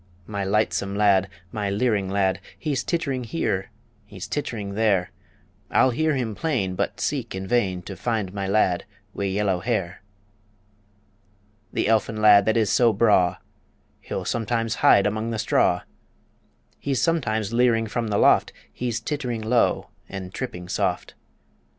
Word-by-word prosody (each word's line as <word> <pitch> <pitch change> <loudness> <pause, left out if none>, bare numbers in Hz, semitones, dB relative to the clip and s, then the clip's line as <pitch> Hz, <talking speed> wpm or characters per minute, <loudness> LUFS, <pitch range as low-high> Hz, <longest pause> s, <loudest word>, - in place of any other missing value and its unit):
My 100 0 -4
lightsome 100 0 0
lad, 100 -2 +3 0.2
my 105 -2 -2
leering 100 -2 0
lad, 95 -1 +1 0.2
He's 145 -4 -2
tittering 140 -7 -1
here; 105 - -2 0.3
he's 100 -3 -9
tittering 110 -9 -4
there 100 -4 +1 0.6
I'll 130 - +4
hear 155 +4 +1
him 120 -5 -2
plain, 100 - -1
but 100 +3 -2
seek 120 -2 -2
in 95 0 -4
vain 95 -5 0
To 95 - -7
find 100 -1 -2
my 100 -1 -3
lad 95 -2 +2 0.3
wi' 100 - -3
yellow 95 -1 0
hair. 100 -4 -2 1.7
The - - 0
elfin 110 0 +1
lad 105 -2 +7
that 110 - +3
is 110 -3 +2
so 120 -2 +4
braw, 95 -5 +3 0.6
He'll - - -5
sometimes 115 0 -1
hide 100 - +6
among 110 +2 -1
the 115 - -2
straw; - - +2 1.0
He's 135 -3 -1
sometimes 115 - 0
leering 115 -2 +3
from 115 +1 -2
the 105 -1 0
loft - - +4 0.2
He's 120 -2 -2
tittering 125 -3 -3
low 115 +2 +1 0.2
and 95 -1 -7
tripping 90 -9 -5
soft. - - -1
110 Hz, 145 wpm, -24 LUFS, 100-120 Hz, 1.7 s, lad